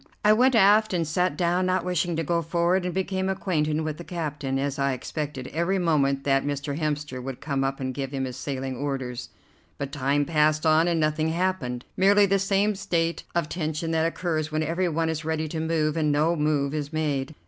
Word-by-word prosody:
I 210 Hz, -, +7 dB
went 250 Hz, +3 st, +4 dB
aft 210 Hz, -1 st, +5 dB
and 165 Hz, -2 st, 0 dB
sat 180 Hz, +4 st, 0 dB
down, 180 Hz, +1 st, +1 dB
not 185 Hz, -1 st, 0 dB
wishing 175 Hz, -1 st, 0 dB
to 165 Hz, -, -1 dB
go 170 Hz, +2 st, 0 dB
forward 170 Hz, +3 st, +1 dB
and 180 Hz, -, -2 dB
became 190 Hz, 0 st, -1 dB
acquainted 160 Hz, -5 st, 0 dB
with 155 Hz, -1 st, -3 dB
the 170 Hz, -, -8 dB
captain, 150 Hz, -6 st, -3 dB
as 140 Hz, 0 st, -2 dB
I 140 Hz, -1 st, +1 dB
expected 145 Hz, 0 st, -5 dB
every 170 Hz, +5 st, 0 dB
moment 140 Hz, -6 st, +1 dB
that 135 Hz, -1 st, +2 dB
Mr. 145 Hz, 0 st, -3 dB
Hemster 150 Hz, -4 st, -2 dB
would 130 Hz, 0 st, -6 dB
come 140 Hz, -2 st, -1 dB
up 135 Hz, 0 st, -2 dB
and 130 Hz, -1 st, -3 dB
give 135 Hz, 0 st, -4 dB
him 135 Hz, -1 st, -2 dB
his 125 Hz, -1 st, -6 dB
sailing 130 Hz, -1 st, -4 dB
orders. 130 Hz, -2 st, -4 dB, 0.5 s
But 140 Hz, -1 st, -4 dB
time 145 Hz, 0 st, +1 dB
passed 155 Hz, 0 st, +2 dB
on 160 Hz, +1 st, +4 dB
and 170 Hz, -2 st, +1 dB
nothing 155 Hz, +1 st, +1 dB
happened, 160 Hz, -8 st, -1 dB
merely 200 Hz, +2 st, +5 dB
the 195 Hz, 0 st, +2 dB
same 195 Hz, +2 st, +2 dB
state 170 Hz, -4 st, -1 dB
of 170 Hz, -3 st, +1 dB
tension 160 Hz, 0 st, -3 dB
that 160 Hz, 0 st, +2 dB
occurs 160 Hz, -3 st, -2 dB
when 155 Hz, 0 st, 0 dB
every 175 Hz, +3 st, 0 dB
one 165 Hz, 0 st, 0 dB
is 160 Hz, 0 st, -2 dB
ready 160 Hz, 0 st, -1 dB
to 160 Hz, -, -4 dB
move 160 Hz, -1 st, 0 dB
and 155 Hz, -2 st, +1 dB
no 155 Hz, +4 st, +2 dB
move 150 Hz, -2 st, 0 dB
is 150 Hz, -1 st, -3 dB
made. 150 Hz, -2 st, -2 dB
155 Hz, 210 wpm, -25 LUFS, 145-175 Hz, 0.5 s, I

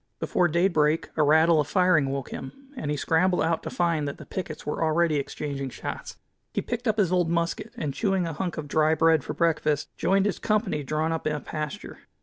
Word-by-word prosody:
Before 180 Hz, -, +2 dB
daybreak 165 Hz, -2 st, +2 dB
a 155 Hz, -, +2 dB
rattle 160 Hz, +2 st, +5 dB
of 145 Hz, -, +1 dB
firing 180 Hz, -5 st, +3 dB
woke 135 Hz, -1 st, -4 dB
him, 270 Hz, -, -9 dB
and 150 Hz, -, -4 dB
he 150 Hz, -, -1 dB
scrambled 180 Hz, +5 st, +2 dB
out 165 Hz, 0 st, 0 dB
to -, -, -5 dB
find 165 Hz, -4 st, 0 dB
that 140 Hz, -, -5 dB
the -, -, -11 dB
pickets 175 Hz, -5 st, -6 dB
were 150 Hz, +2 st, -2 dB
already 160 Hz, -1 st, +2 dB
exchanging 140 Hz, -1 st, -4 dB
shots. -, -, -7 dB, 0.4 s
He -, -, +1 dB
picked 240 Hz, 0 st, -4 dB
up 220 Hz, -1 st, +1 dB
his 190 Hz, -5 st, +2 dB
old 180 Hz, -2 st, +2 dB
musket, 170 Hz, +6 st, -1 dB
and 150 Hz, -, -2 dB
chewing 195 Hz, +1 st, 0 dB
a 165 Hz, -, -3 dB
hunk 175 Hz, +2 st, -3 dB
of 155 Hz, -2 st, -4 dB
dry 155 Hz, +1 st, +3 dB
bread 160 Hz, -2 st, +4 dB
for -, -, -5 dB
breakfast, 155 Hz, -3 st, 0 dB
joined 195 Hz, +1 st, +2 dB
his 205 Hz, -, -1 dB
company 210 Hz, -8 st, 0 dB
drawn 155 Hz, +3 st, -1 dB
up 160 Hz, -1 st, -2 dB
in 155 Hz, -, 0 dB
a -, -, -3 dB
pasture. 155 Hz, +6 st, -6 dB
160 Hz, 215 wpm, -26 LUFS, 150-180 Hz, 0.4 s, rattle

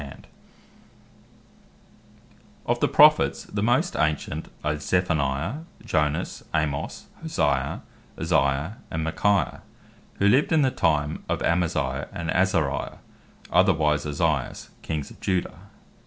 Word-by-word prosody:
The 70 Hz, -, -8 dB
Prophets 70 Hz, -, -14 dB, 2.4 s
Of -, -, 0 dB
the -, -, +3 dB
Prophets, -, -, +5 dB
the 100 Hz, -, -4 dB
most 125 Hz, -, +2 dB
ancient, 75 Hz, -1 st, -1 dB, 0.2 s
are 75 Hz, 0 st, +1 dB
Sophoniah, 80 Hz, -, -1 dB, 0.2 s
Jonas, 75 Hz, -1 st, -1 dB
Amos, 75 Hz, -2 st, -2 dB, 0.2 s
Hosea, -, -, -1 dB, 0.4 s
Isaiah 70 Hz, -, +1 dB
and 80 Hz, 0 st, -3 dB
Michaiah, 100 Hz, +5 st, +1 dB, 0.5 s
who 100 Hz, -, +2 dB
lived 130 Hz, +10 st, +4 dB
in 160 Hz, -2 st, +4 dB
the 130 Hz, -, +2 dB
time 75 Hz, -6 st, 0 dB
of -, -, -1 dB
Amaziah, 80 Hz, -6 st, 0 dB
and 85 Hz, -2 st, -4 dB
Azariah, 85 Hz, -7 st, 0 dB, 0.5 s
otherwise 80 Hz, -5 st, +3 dB
Ozias, 75 Hz, -2 st, -1 dB
Kings 75 Hz, -3 st, -4 dB
of -, -, -15 dB
Judah. 95 Hz, -2 st, -2 dB
80 Hz, 110 wpm, -25 LUFS, 75-95 Hz, 2.4 s, Prophets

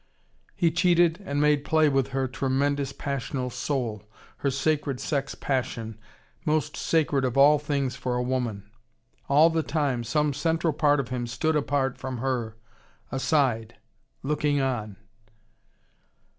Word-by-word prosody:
He 170 Hz, -1 st, +2 dB
cheated 175 Hz, +1 st, +3 dB
and 145 Hz, 0 st, -1 dB
made 150 Hz, -1 st, +3 dB
play 155 Hz, 0 st, +3 dB
with 135 Hz, -2 st, +2 dB
her 135 Hz, -1 st, -1 dB
tremendous 135 Hz, +2 st, 0 dB
passional 135 Hz, -2 st, -3 dB
soul, 120 Hz, -6 st, -2 dB, 0.4 s
her 140 Hz, -, 0 dB
sacred 140 Hz, 0 st, 0 dB
sex 140 Hz, -2 st, -2 dB
passion, 115 Hz, -5 st, -3 dB, 0.4 s
most 155 Hz, -1 st, 0 dB
sacred 150 Hz, -4 st, +1 dB
of 130 Hz, 0 st, -1 dB
all 145 Hz, +2 st, +6 dB
things 140 Hz, -4 st, -1 dB
for 125 Hz, -1 st, -2 dB
a 125 Hz, -, 0 dB
woman. 120 Hz, -5 st, -2 dB, 0.6 s
All 155 Hz, +4 st, +6 dB
the 160 Hz, 0 st, +1 dB
time, 145 Hz, -6 st, -1 dB
some 150 Hz, +5 st, +1 dB
central 165 Hz, +3 st, 0 dB
part 145 Hz, -1 st, +3 dB
of 130 Hz, -2 st, -3 dB
him 125 Hz, -1 st, -3 dB
stood 140 Hz, +7 st, 0 dB
apart 140 Hz, -2 st, 0 dB
from 130 Hz, -1 st, -4 dB
her, 120 Hz, -3 st, -2 dB, 0.5 s
aside, 130 Hz, -4 st, +1 dB, 0.5 s
looking 145 Hz, 0 st, +1 dB
on. 115 Hz, -7 st, -2 dB
140 Hz, 135 wpm, -26 LUFS, 125-150 Hz, 0.6 s, all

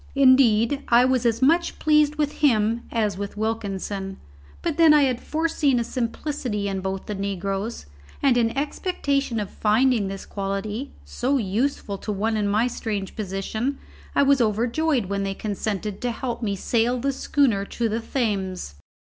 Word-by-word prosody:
Indeed, 260 Hz, -2 st, +5 dB
I 240 Hz, +1 st, +5 dB
was 255 Hz, -2 st, +2 dB
as 230 Hz, +2 st, 0 dB
much 335 Hz, +5 st, +3 dB
pleased 300 Hz, -1 st, +3 dB
with 300 Hz, -1 st, -2 dB
him 230 Hz, -4 st, +3 dB
as 210 Hz, -5 st, 0 dB
with 200 Hz, 0 st, -5 dB
Wilkinson, 200 Hz, -3 st, -3 dB, 0.5 s
but 325 Hz, -3 st, -1 dB
then 325 Hz, -2 st, +7 dB
I 295 Hz, -, +5 dB
had 255 Hz, -3 st, 0 dB
foreseen 310 Hz, -5 st, +1 dB
a -, -, 0 dB
simplicity 235 Hz, -2 st, -3 dB
in 195 Hz, -1 st, -2 dB
both 190 Hz, 0 st, -4 dB
the 210 Hz, -, -4 dB
negroes, 195 Hz, -, -3 dB, 0.3 s
and 270 Hz, -3 st, +3 dB
in 235 Hz, -2 st, +3 dB
expectation 280 Hz, -, -1 dB
of 205 Hz, -2 st, -4 dB
finding 225 Hz, 0 st, +2 dB
this 195 Hz, 0 st, -6 dB
quality, 205 Hz, +6 st, -4 dB, 0.2 s
so 270 Hz, +3 st, 0 dB
useful 215 Hz, -1 st, -1 dB
to 210 Hz, -, -4 dB
one 215 Hz, +3 st, 0 dB
in 210 Hz, -1 st, 0 dB
my 215 Hz, +3 st, +2 dB
strange 210 Hz, -5 st, -3 dB
position, 215 Hz, +6 st, -3 dB, 0.4 s
I -, -, +5 dB
was 275 Hz, -2 st, +4 dB
overjoyed 235 Hz, +4 st, +1 dB
when 200 Hz, +1 st, -2 dB
they 195 Hz, 0 st, -2 dB
consented 205 Hz, -1 st, -3 dB
to 245 Hz, -, 0 dB
help 240 Hz, +1 st, -4 dB
me 205 Hz, -3 st, -1 dB
sail 235 Hz, +5 st, +1 dB
the 275 Hz, +3 st, 0 dB
schooner 260 Hz, -7 st, +1 dB
to 235 Hz, +3 st, -2 dB
the 220 Hz, +1 st, -1 dB
Thames. 195 Hz, -, -2 dB
225 Hz, 165 wpm, -24 LUFS, 200-270 Hz, 0.5 s, then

